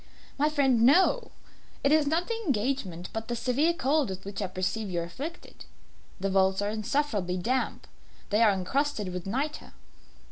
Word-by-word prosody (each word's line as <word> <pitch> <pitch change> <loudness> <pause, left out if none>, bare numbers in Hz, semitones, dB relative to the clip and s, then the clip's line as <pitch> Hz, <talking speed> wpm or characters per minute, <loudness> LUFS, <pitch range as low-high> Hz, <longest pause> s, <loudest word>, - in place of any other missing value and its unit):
"My 295 +2 +2
friend, 270 -6 +2
no. 375 - +4 0.5
It 280 - +3
is 305 -1 +4
not 325 +4 +1
the 465 - -1
engagement, 220 - -1
but 225 0 -4
the 240 - -2
severe 265 +7 +2
cold 300 -4 +1
with 190 0 -6
which 200 +1 -5
I 195 - -1
perceive 190 +3 -2
you 175 -2 -1
are - - -2
afflicted. 280 - -8 0.5
The 195 +1 -1
vaults 190 0 +3
are 205 +1 0
insufferably 215 -5 -1
damp. 255 +9 -1 0.5
They 210 +2 +3
are 225 - +7
encrusted 210 +1 -1
with 180 0 -5
nitre." 280 +9 -3
230 Hz, 170 wpm, -28 LUFS, 195-290 Hz, 0.5 s, are